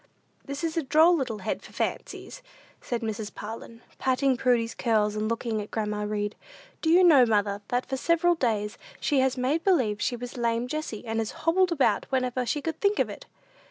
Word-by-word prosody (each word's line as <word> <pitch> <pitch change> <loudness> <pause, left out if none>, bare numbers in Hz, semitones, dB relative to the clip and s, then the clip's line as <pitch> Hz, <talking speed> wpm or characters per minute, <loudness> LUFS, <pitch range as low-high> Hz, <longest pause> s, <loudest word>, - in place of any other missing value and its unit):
"This 280 +3 -6
is 330 0 -2
a - - +3
droll 315 +5 +5
little 255 -8 -2
head - - -2
for - - -14
fancies," - - -4 0.4
said 240 -1 -3
Mrs. 220 -1 -4
Parlin, 230 +2 -8 0.2
patting 260 0 +2
Prudy's 240 -2 +1
curls, 215 -3 +1
and 215 +1 -1
looking 230 -1 -2
at 205 - -8
grandma 210 -1 -2
Read. 210 0 -2 0.5
"Do 320 - 0
you 355 +3 +6
know, 305 -8 +7
mother, 205 -3 +1
that 245 +1 -1
for 265 - -3
several 335 +4 +3
days 220 -9 -1 0.2
she 285 -3 +1
has 260 0 +1
made 275 +6 0
believe 240 - +2
she 245 - 0
was 245 +1 -7
lame 235 0 0
Jessie, 275 -6 -5
and 225 0 -2
has 220 -1 -1 0.2
hobbled 360 +2 +3
about 265 -10 +2
whenever 255 -1 -1
she 295 +2 -1
could 325 -1 -4
think 405 0 +2
of - - +1
it." - - -11
245 Hz, 195 wpm, -27 LUFS, 220-305 Hz, 0.5 s, know